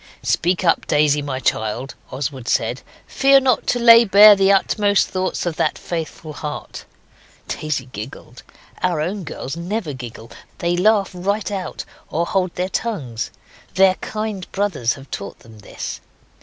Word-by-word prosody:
'Speak 180 +2 +1
up, 165 - +2
Daisy, 150 0 +3
my 135 -2 -4
child.' 120 +2 -1 0.2
Oswald 130 -2 -5
said; - - 0 0.2
'fear 275 0 +4
not 260 -3 +1
to - - +2
lay 235 -1 +8
bare 210 0 +8
the 195 0 +3
utmost 205 +1 +2
thoughts 185 -1 -2
of 170 -3 -3
that - - 0
faithful 160 -2 -5
heart.' 150 0 -7 0.6
Daisy 150 -4 -3
giggled. 120 0 -9 0.4
Our 175 -4 +1
own 185 +6 -2
girls 140 -2 -6
never 175 -1 -3
giggle 120 -3 -9 0.3
they 175 0 0
laugh 200 +2 +3
right 200 +4 -2
out 190 -4 -5 0.2
or 170 +2 0
hold 185 -1 -1
their 180 +1 -1
tongues. 145 - -3 0.5
Their 190 0 +5
kind 215 -3 -4
brothers 190 - 0
have 135 0 -13
taught 100 -1 -6
them 110 -2 -16
this. 100 - -7
175 Hz, 150 wpm, -20 LUFS, 140-200 Hz, 0.6 s, lay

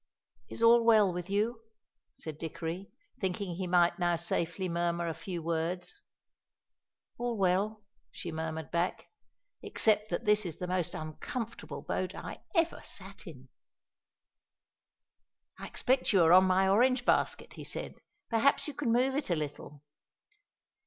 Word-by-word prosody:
"Is - - -3
all 230 0 +7
well 215 -5 +5
with 175 +1 -5
you?" 220 +4 0 0.6
said 155 -2 -5
Dickory, 165 +3 -5 0.3
thinking 185 0 -2
he 185 -1 -2
might 175 +1 +3
now 175 -1 +2
safely 170 +2 -1
murmur 170 0 -1
a 165 - -1
few 175 0 -6
words. 170 - -2 1.2
"All 240 -1 -1
well," 200 +3 +1 0.3
she 170 - -7
murmured 160 -1 -4
back, 170 +2 -1 0.5
"except 215 -1 +2
that - - -2
this 210 0 +4
is 170 -5 -5
the 180 - -4
most 180 -2 -1
uncomfortable 215 +9 -6
boat - - -2
I - - -7 0.2
ever 335 -1 +2
sat - - -9
in!" - - -11 2.1
"I - - -6
expect 260 +1 +1
you 190 -5 +5
are 165 +1 +6
on 185 +1 +8
my 190 +1 +3
orange 250 +5 +3
basket," - - +1
he - - -9
said; - - -3 0.3
"perhaps 230 +7 +3
you 295 - -4
can 275 -4 -1
move 255 +3 +3
it 285 -4 -2
a 175 - +2
little." 150 -1 -6
185 Hz, 145 wpm, -31 LUFS, 170-225 Hz, 2.1 s, on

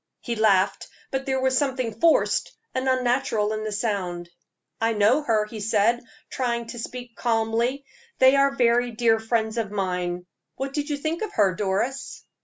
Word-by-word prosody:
He 235 - -4
laughed, 200 -3 +2 0.2
but 270 0 -3
there 265 0 +1
was 260 0 +1
something 255 -5 -1
forced 330 -1 +3 0.2
and 260 0 0
unnatural 245 -4 +1
in 215 0 -3
the 215 - -3
sound. 185 -5 -2 0.5
"I 225 0 +2
know 220 +7 +3
her," 225 -7 +1
he 215 +1 -8
said, 225 +3 +2 0.3
trying 235 -2 -1
to 240 - -7
speak 245 0 -7
calmly; 235 +3 0 0.3
"they 260 +1 +6
are 275 0 +5
very 245 -1 +3
dear 225 -1 +2
friends 225 0 -1
of 220 -3 -2
mine. 180 -3 -2 0.3
What 270 +1 -4
did 295 +1 -2
you 290 - -1
think 315 +3 -3
of 430 -2 -4
her, 195 -3 +3
Doris?" 205 +8 -2
235 Hz, 170 wpm, -24 LUFS, 210-260 Hz, 0.5 s, they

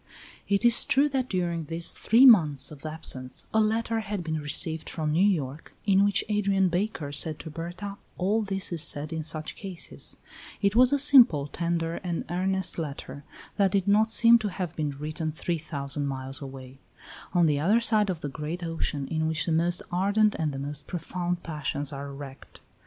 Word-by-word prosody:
It 200 +3 +1
is 235 0 +8
true 275 +3 +3
that 265 -2 -2
during 170 -3 -2
these 165 +2 0
three 235 +4 +4
months 155 - +5
of 150 +1 -9
absence 130 -5 -3
a 220 - +4
letter 225 +1 0
had 205 -4 -4
been 160 -1 -3
received 160 +2 +1
from 155 -2 -3
New 165 +4 +2
York, 155 -7 -1
in 195 -1 +4
which 200 -1 +2
Adrian 200 -3 +1
Baker 175 -5 -2
said 150 +2 0
to 160 - -9
Berta 175 +5 -7 0.2
all 205 +5 +1
that 195 -3 -2
is 165 - 0
said 150 0 +1
in 160 - -3
such 155 0 -3
cases; 190 -4 -2 0.4
it 200 +1 +1
was 250 +2 +5
a 285 - +3
simple, 250 - +6
tender 170 +2 -2
and 175 -3 -4
earnest 190 +1 -2
letter, 140 -2 -6 0.3
that 195 -2 +2
did 195 -1 +1
not 215 +2 +3
seem 235 +1 +6
to 215 - -3
have 180 -3 -5
been 150 -2 -2
written 155 +3 -4
three 165 +2 -3
thousand 145 -2 -3
miles 135 0 -3
away; 135 -1 -10 0.6
on 175 -1 +4
the 150 -2 +1
other 200 +10 +3
side 215 -3 +1
of 175 -4 -3
the - - -3
great 155 +5 -5
ocean 160 -4 -3
in 160 -1 -1
which 160 -1 -1
the 170 - -2
most 170 +2 0
ardent 200 +4 +2
and 155 -2 0
the 135 - -6
most 145 +1 -6
profound 175 +1 -4
passions 150 -2 -3
are 140 0 -6
wrecked. 140 -1 -11
170 Hz, 190 wpm, -26 LUFS, 150-200 Hz, 0.6 s, is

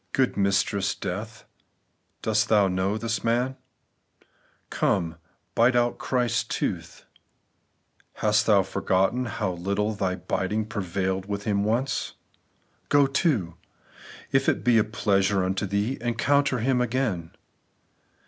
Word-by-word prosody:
Good 130 -1 +1
mistress 100 0 +1
Death, 105 +4 -6 0.8
dost 110 +1 +1
thou 105 -3 +5
know 95 +3 0
this 115 0 -2
man? 120 +3 +1 1.2
Come, 85 -5 0 0.4
bite 120 +2 +4
out 120 0 +1
His 125 -3 +1
tooth: - - -4 1.1
hast 105 0 +1
thou 100 -3 +5
forgotten 95 +8 0
how 110 -4 -2
little 100 +5 -1
thy 95 -3 -1
biting 105 +4 -2
prevailed 95 -2 -2
with 100 0 -3
Him 100 -1 0
once? 120 +6 -1 0.8
Go 145 -1 +5
to! 135 - 0 0.8
if - - +3
it - - -1
be 120 -2 +4
a - - +4
pleasure 100 -2 +1
unto 95 +2 -1
thee, 100 +7 -1
encounter 130 +3 +1
Him 125 +2 +1
again. 115 -9 -2
105 Hz, 120 wpm, -25 LUFS, 95-120 Hz, 1.2 s, thou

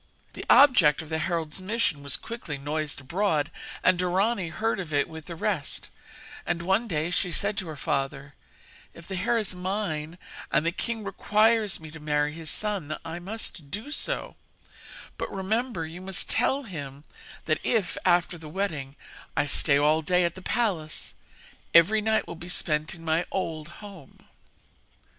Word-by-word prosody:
The - - -7
object 185 - +7
of 155 - -12
the 160 0 -1
herald's 165 0 -1
mission 195 -7 0
was 140 -1 -2
quickly 230 -11 -6
noised 145 +1 -2
abroad, 155 0 0 0.3
and 185 -1 +5
Dorani 185 +1 +1
heard 220 +4 -1
of 175 -5 -5
it 145 -1 +2
with 160 -1 -9
the 170 - -5
rest; - - -2 0.5
and, 170 0 -1
one 190 +6 +2
day, 160 -2 -1
she 180 +1 0
said 200 +5 +1
to 190 - -2
her 155 - -5
father: 135 +1 -2 0.6
'If 170 - -12
the 195 - -5
hair 230 +6 +1
is 215 -4 -1
mine, 180 -4 -3 0.3
and 155 - +3
the 170 - +3
king 225 +4 -3
requires 210 +2 +2
me 160 -1 -10
to 160 - -9
marry 150 0 +1
his 160 -1 -6
son, 195 -8 -1
I 165 +1 -4
must 185 -5 -5
do 215 - -5
so; - - -1 0.8
but, - - -3
remember, 200 -1 -1
you 165 +3 -8
must 190 -1 -2
tell 265 +4 +2
him 145 - -7 0.4
that 155 - +1
if, 225 -6 +1
after 175 -1 +3
the 155 -1 -9
wedding, 150 -7 -3 0.4
I - - +3
stay 140 0 +4
all 150 +2 +4
day 180 +3 +3
at 170 -1 +1
the 185 - -10
palace, 185 -8 -1 0.6
every 205 +6 +7
night 220 +1 +2
will - - -5
be 170 +1 -9
spent 155 -1 +1
in 165 -1 -12
my 160 +2 +1
old 160 -5 -3 0.2
home.' 190 -9 -12
175 Hz, 170 wpm, -27 LUFS, 155-200 Hz, 0.8 s, object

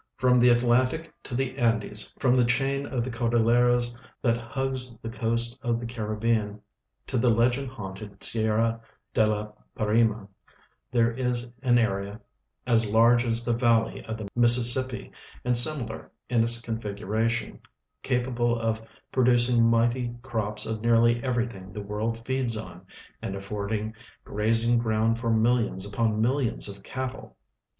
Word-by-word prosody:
From 125 -1 +3
the 125 +1 +5
Atlantic 125 +6 +2
to 125 - -6
the 135 +1 -2
Andes, 115 -3 0
from 125 -2 +2
the 125 -1 +4
chain 135 +3 0
of 125 -3 -2
the 130 - -5
Cordil 120 0 +1
leras 120 +1 +2 0.3
that 115 -2 +3
hugs 125 +1 -3
tire 115 - -7
coast 115 +1 -1
of 120 -3 -1
the 120 - -6
Caribbean 110 -2 -2 0.5
to 130 - -1
the 120 - +3
legend 120 +4 +2
haunted 100 -4 -9
Sierra 115 +1 0 0.3
de 110 - +3
la 105 0 -2 0.3
Parima, 110 -1 +1 0.6
there 115 -1 +2
is 125 0 -2
an 125 -2 +3
area 100 -2 -1 0.5
as 115 -4 +3
large 115 +2 +5
as 115 0 0
the 120 - +1
valley 115 -2 +1
of 110 0 -5
the 110 -2 -6
INIississippi, 120 +1 +4 0.3
and 125 0 +2
similar 120 -2 +2 0.2
in 120 -2 +3
its 115 +1 0
configuration, 110 0 -3 0.4
capable 120 -2 0
of 110 -1 -1 0.3
producing 120 -2 +3
mighty 120 +1 +1
crops 110 -4 0
of 110 -1 -3
nearly 115 +1 +3
CAmrything 115 -7 -3
the 105 - -5
Avorld 110 +3 -4
feeds 130 -4 0
on, 110 - -9 0.4
and 95 - -4
afford 100 +1 -5
ing 110 0 -2 0.3
grazing 115 +3 +2
ground 115 0 0
for 115 -1 -2
millions 110 -3 +1
upon 105 +1 -1
millions 120 0 +1
of 100 -1 -8
cattle. 130 +4 -6
115 Hz, 145 wpm, -26 LUFS, 110-120 Hz, 0.6 s, the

